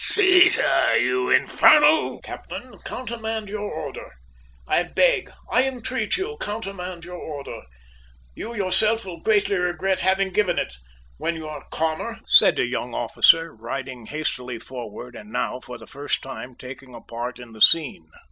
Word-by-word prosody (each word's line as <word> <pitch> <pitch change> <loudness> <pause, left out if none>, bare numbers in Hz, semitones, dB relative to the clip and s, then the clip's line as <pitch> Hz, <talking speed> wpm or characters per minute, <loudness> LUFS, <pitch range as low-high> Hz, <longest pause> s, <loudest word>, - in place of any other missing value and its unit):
Seize 370 -3 +6
her, - - +3
you 380 -1 +1
infernal - - +5
" - - -29
"Captain, - - -9
countermand 225 -4 -5
your 210 0 -4
order! 155 -4 -6 0.6
I - - +3
beg, - - +1 0.2
I 255 +2 +3
entreat 255 - -2
you, 430 +4 -4
countermand 195 -5 -5
your 180 0 -8
order! 140 -7 -7 0.7
You 235 - -7
yourself 215 +3 +1
will 175 -3 -8
greatly 205 -1 +2
regret 180 +1 0
having 190 0 +1
given 185 -4 +1
it, - - -2 0.4
when 170 - -2
you 160 -1 -7
are 150 -2 -7
calmer," 160 +9 -2
said - - +6
a - - +2
young - - -4
officer, 165 0 +4
riding 125 +1 -6
hastily 125 -5 -3
forward, 120 0 -9
and 210 - -11
now, 130 - -2
for 125 -1 -9
the - - -13
first 145 +1 -3
time, 130 -1 -8
taking 130 0 -11
a - - -10
part 120 +1 -6
in 120 -2 -12
the 110 -1 -13
scene. 145 - +4
175 Hz, 155 wpm, -23 LUFS, 130-215 Hz, 0.7 s, Seize